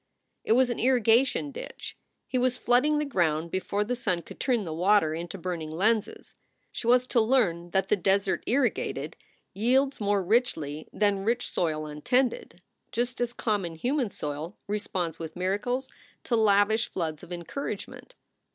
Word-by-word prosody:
It - - +3
was 250 +1 +4
an 240 - -3
irrigation 255 +3 +3
ditch. - - -8 0.3
He 255 - 0
was 250 0 +1
flooding 265 +5 +3
the 300 - 0
ground 170 - 0
before 200 +2 -1
the 245 +4 -2
sun 185 -8 -1
could - - -12
turn 245 -5 +1
the 165 -4 -5
water 180 -1 +3
into 170 +4 -5
burning 170 -3 -4
lenses. 210 +7 -1 0.4
She 230 - -5
was 250 +1 +5
to 245 -2 +2
learn 205 -8 +2
that 190 +2 0
the - - +5
desert 195 0 +1
irrigated 220 - 0 0.4
yields 260 +6 +2
more 205 -1 +1
richly 165 - 0
than 205 -2 +1
rich 235 +3 0
soil 155 -3 -1
untended; 185 - -1 0.3
just 245 +1 -2
as 240 -1 0
common 205 -8 -2
human 250 - 0
soil 150 +2 -5
responds 185 -5 -3
with 160 -1 -6
miracles 205 +8 -1 0.4
to 240 - 0
lavish 220 0 +3
floods 160 -3 -3
of 180 - -13
encouragement. 230 - -6
205 Hz, 155 wpm, -27 LUFS, 175-245 Hz, 0.4 s, was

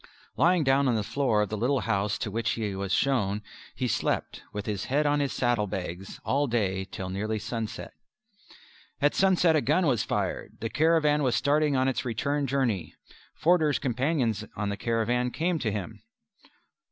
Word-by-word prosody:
Lying 175 -1 +3
down 135 0 +3
on 120 - +2
the 110 - 0
floor 110 -3 +1
of 105 - -5
a - - -1
little 125 +5 +1
house 100 -1 0
to 105 - -4
which 115 +2 -1
he 105 -3 -2
was 95 0 -4
shown, 105 -5 +1 0.3
he 130 - -1
slept, 115 - -1
with 105 0 -5
his 105 -3 -3
head 145 +3 +1
on 145 0 +2
his 140 -2 0
saddlebags, 95 -5 -2
all 145 +1 +1
day 95 -5 0
till 95 -1 -6
nearly 110 +3 -2
sunset. 110 +1 -5 1.1
At 145 +1 +3
sunset 180 -4 +4
a 155 - +3
gun 155 +9 +2
was 125 -8 +2
fired. - - -2
The 115 0 -4
caravan 155 0 +3
was 125 -4 +2
starting 145 0 +2
on 130 0 +2
its 135 - -1
return 140 +4 -1
journey. 120 -9 -1 0.4
Forder's 160 -4 +3
companions 130 - 0
on 105 -1 -2
the 100 - -2
caravan 120 +2 0
came 165 +5 -1
to 115 -5 -1
him. 105 +1 -5
120 Hz, 175 wpm, -27 LUFS, 105-145 Hz, 1.1 s, sunset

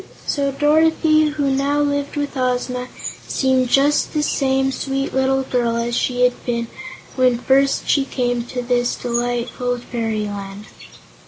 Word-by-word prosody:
So 280 -1 0
Dorothy, 310 +2 +3
who 290 -2 -1
now 280 +2 +1
lived 285 -1 -1
with 290 0 -3
Ozma, 250 -1 -1 0.4
seemed 260 -2 +1
just 285 +3 +3
the 300 -1 0
same 270 -2 +1
sweet 270 +1 -3
little 265 0 +1
girl 235 -2 -1
she 245 +1 0
had 250 0 +1
been 235 -1 -1 0.5
when 255 -2 +3
first 270 +3 +2
she 280 - +3
came 245 -3 -1
to 245 0 -5
this 245 0 0
delightful 245 +1 -2
fairyland. 210 -4 -4
255 Hz, 135 wpm, -20 LUFS, 245-280 Hz, 0.5 s, Dorothy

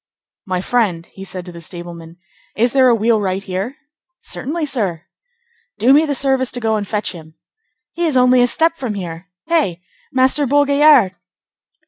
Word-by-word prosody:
"My 185 -1 -1
friend," 195 -7 0
he 195 - -12
said 185 -2 -6
to 180 - -9
the 170 -1 -11
stableman, 170 0 -9 0.4
"is 235 +2 +2
there 265 -2 +5
a 235 - +4
wheelwright 210 -4 0
here?" 195 +8 -4 0.4
"Certainly, 310 +4 -4
sir." 195 - -2 0.7
"Do 240 +6 +4
me 310 +2 +4
the 285 - -1
service 265 -1 +1
to 245 - -3
go 225 -2 0
and 205 -2 -3
fetch 210 +1 -2
him." 160 -3 -13 0.6
"He 345 0 -1
is 290 -5 +1
only 250 0 +5
a 245 - +4
step 325 +6 +1
from 250 -9 -4
here. 175 -1 -7 0.2
Hey! 300 - 0 0.3
Master 265 +2 +2
Bourgaillard!" 285 -5 +4
230 Hz, 165 wpm, -18 LUFS, 185-270 Hz, 0.7 s, there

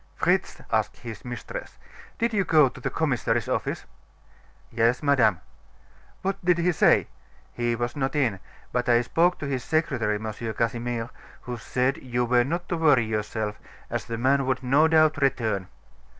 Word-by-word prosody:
"Fritz," - - 0
asked - - 0
his 115 -3 -8
mistress, 120 -1 -7 0.4
"did 235 0 0
you 200 -2 +2
go 155 -6 +5
to - - -13
the - - -1
commissary's 120 -7 0
office?" - - -2 0.9
"Yes, 115 +4 +1
madame." 125 - +3 0.8
"What 195 0 -2
did 180 -1 +3
he 175 +1 +2
say?" 160 - +4 0.5
"He 120 0 0
was 120 +1 -3
not 135 0 -2
in; 120 -10 +1 0.3
but 125 0 -1
I 120 0 +5
spoke 170 +8 +2
to - - -5
his 130 -3 -2
secretary, 120 -10 0
M. 110 +1 -4 0.2
Casimir, 115 0 -2 0.3
who 125 - -5
said 125 +3 -1
you 125 -1 -2
were 120 0 +3
not 170 +7 -3
to 170 - -1
worry 145 -8 +4
yourself, 105 -1 -3 0.3
as - - -2
the 115 - -4
man 135 +2 +2
would 130 0 -1
no 140 +5 +4
doubt 155 -1 +4
return." 110 -9 0
125 Hz, 165 wpm, -25 LUFS, 115-150 Hz, 0.9 s, go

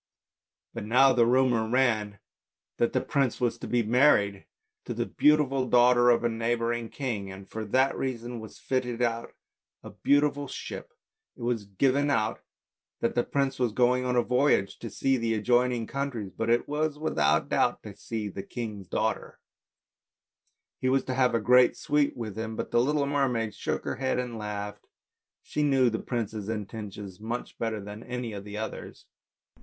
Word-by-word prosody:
But - - -5
now 130 +4 +5
the 120 -2 +4
rumour 120 -3 +3
ran 110 -5 +1 0.6
that 120 - +2
the - - +1
prince 135 -5 0
was 120 -2 0
to - - -6
be 120 -1 +1
married 105 -5 +3 0.4
to - - -4
the - - -1
beautiful 140 -3 +2
daughter 120 0 +5
of 120 -1 +4
a - - +3
neighbouring 115 0 -1
king, 110 -8 -4
and 95 0 -10
for 110 +2 -5
that 130 +6 +2
reason 120 -2 -4
was 110 -1 -10
fitting 125 -2 -1
out 115 -1 -2 0.5
a - - -10
splendid 145 -1 +1
ship. - - -7 0.4
It - - -9
was 120 -3 -1
given 135 +8 +1
out 110 -5 0 0.6
that 115 - +1
the 120 - +1
prince 135 -2 -1
was 120 -4 +1
going 125 +2 +3
on 125 0 0
a 120 - +3
voyage 125 -5 +2
to 115 - -6
see 135 +5 +1
the 115 -1 0
adjoining 120 +2 +2
countries, 125 -7 -4
but 115 0 -2
it 120 +1 +2
was 150 0 -1
without 155 +1 +1
doubt - - +1
to 105 -3 -9
see 110 +1 -4
the 100 0 -6
king's 105 -2 -6
daughter; - - -2 1.4
he 130 - +1
was 135 0 +2
to 130 - -3
have 125 -2 +2
a - - +3
great 125 +3 +5
suite 150 -2 +1
with 110 -4 -5
him, 110 0 -4
but - - -4
the 120 - +4
little 145 +2 +1
mermaid 125 -6 0
shook - - -3
her - - -3
head 130 -1 0
and 120 -3 -3
laughed; 105 -1 -6 0.6
she 150 - -3
knew 135 -4 +3
the 110 - -2
prince's 110 -4 -4
intentions 105 -3 -6
much 115 +3 -5
better 115 -2 -2
than 105 +2 -8
any 125 -2 -5
of 100 -1 -6
the 105 0 -7
others. 110 +1 -6
120 Hz, 175 wpm, -28 LUFS, 110-130 Hz, 1.4 s, now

